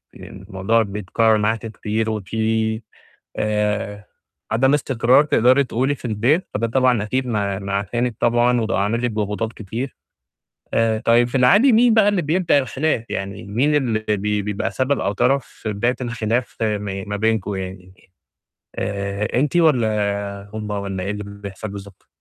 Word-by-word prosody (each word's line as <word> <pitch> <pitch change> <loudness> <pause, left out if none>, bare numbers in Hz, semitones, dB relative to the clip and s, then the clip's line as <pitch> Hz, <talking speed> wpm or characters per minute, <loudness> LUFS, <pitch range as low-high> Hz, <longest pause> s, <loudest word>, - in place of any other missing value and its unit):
الموضوع 95 +4 -1
بيتكرّر 105 +2 +1
معاكِ 110 +2 0
كتير 110 0 -2
وفي 110 +1 -1 0.6
آآ 105 -1 -1 0.5
عدم 130 +5 +3
استقرار 130 -1 +3
تقدري 130 -1 +4
تقولي 130 +3 0
في 130 - -16
البيت، 120 - +1
فده 115 +2 0
طبعًا 125 -2 +2
أكيد 130 +5 -1
ما 100 -4 -1
ما 100 0 -5
عشانِك 120 +5 -1
طبعًا 120 +1 +3
وده 110 -3 -1
عامل 110 +4 0
لِك 120 - +1
ضغوطات 105 +1 -2
كتير. 115 +5 -6 0.8
آآ 115 -1 +2
طيب 120 +2 +3
في 120 - -13
العادي 200 - +5
مين 230 +1 +5
بقى 220 -2 +5
اللي 200 -4 +1
بيبدأ 165 0 +2
الخلاف؟ 135 -2 -1
يعني 100 +2 -4
مين 125 +9 +1
اللي 115 -7 0
بي 105 +1 -1
بيبقى 105 0 -2
سبب 135 +2 0
أو 100 +2 0
طرف 125 +6 +1
في 110 - -6
بداية 120 +5 0
الخلاف 120 0 -2
ما 105 -3 -2
ما 105 0 -4
بينكم 110 -2 0
يعني 95 0 -7 0.8
آآ 100 +1 -2
أنتِ 150 +4 0
والّا 105 -9 +1
هم 105 -1 -5
والّا 100 -2 -3
إيه 100 - -3
اللي 105 0 -4
بيحصل 100 0 -8
بالضبط؟ 100 -1 -10
110 Hz, 155 wpm, -21 LUFS, 100-125 Hz, 0.8 s, العادي